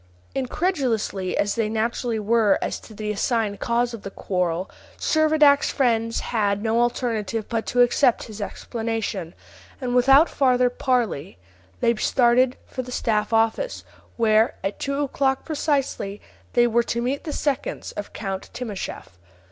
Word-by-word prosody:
Incredulous 265 - -1
as 195 +1 -1
they 225 -2 0
naturally 230 +1 -1
were 215 -1 +3
as - - -3
to 220 - -14
the 210 0 -3
assigned 210 -1 0
cause 235 0 0
of 230 - -7
the 195 - -6
quarrel, 180 -2 -2 0.3
Servadac's 310 -2 +4
friends 230 -4 +1
had 205 -3 0
no 230 +1 +2
alternative 230 -3 -1
but 225 -2 -2
to 245 - +2
accept 245 0 +3
his 215 -2 -9
explanation, 220 -5 -4 0.4
and 250 -3 -2
without 270 +6 +6
farther 250 -2 +2
parley 240 - -1 0.4
they 235 - +4
started 245 +2 +3
for 255 - -5
the 250 0 -9
staff 215 -3 0
office, 225 - +1 0.3
where, 220 -1 +3
at 195 +1 -3
two 280 +1 -1
o'clock 270 -1 0
precisely, 275 -9 -1 0.3
they 240 - +5
were 235 0 +3
to 235 0 -2
meet 255 +4 -2
the 310 - -4
seconds 285 -2 -2
of 205 - -7
Count 195 -2 -5
Timascheff. 200 - -6
235 Hz, 145 wpm, -23 LUFS, 210-255 Hz, 0.4 s, without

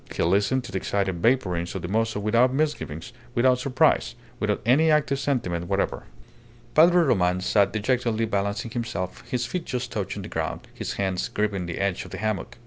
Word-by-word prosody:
He - - -1
listened 100 +9 +2
to 125 - -9
the 95 - -1
excited 95 -2 -1
vapourings 95 -9 +1
of 95 - -4
the - - -3
mozo 110 +2 0
without 115 +5 +3
misgivings, 135 - -2 0.2
without 125 +1 +4
surprise, 125 - +2 0.2
without - - 0
any 145 +7 +4
active 150 -3 +2
sentiment 90 -13 -1
whatever. - - -1 0.7
Padre 175 +2 +6
Roman 90 - +2
sat 100 +2 +2
dejectedly 115 0 0
balancing 100 +1 -2
himself, 95 -7 -4
his 125 -1 -1
feet 175 +7 -4
just 125 -1 -3
touching 105 -5 -4
the - - -6
ground, - - -3
his - - -4
hands 95 -2 -1
gripping 100 -4 -1
the 85 - -4
edge 100 -2 -1
of - - -11
the 95 - -7
hammock. 110 +1 -3
110 Hz, 180 wpm, -25 LUFS, 95-125 Hz, 0.7 s, Padre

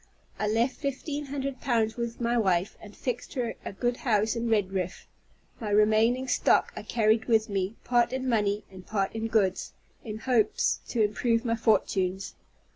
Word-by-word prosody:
I 210 - 0
left 230 +5 +1
fifteen 285 +1 -3
hundred 275 -1 -4
pounds 225 -3 +1
with 235 -1 -4
my 235 0 +1
wife, 190 -4 +1
and 205 -1 -12
fixed 250 +1 -4
her 245 -3 -1
in - - -6
a - - -5
good 240 +5 -1
house 220 -2 +1
at 230 - -2
Redriff. 195 -5 -1 0.5
My 220 - -4
remaining 220 +5 +3
stock - - +2
I - - -5
carried 220 -1 +2
with 220 -2 +2
me, 195 +1 -1
part 240 -1 +2
in 260 0 -2
money 210 -3 +1
and 185 -1 -11
part 195 -1 -1
in 225 0 -2
goods, 200 -4 0 0.3
in 215 -3 -5
hopes 230 -1 +1
to 230 -3 +1
improve 230 +3 +1
my 230 -1 +1
fortunes. 195 -4 +1
225 Hz, 175 wpm, -28 LUFS, 210-245 Hz, 0.5 s, remaining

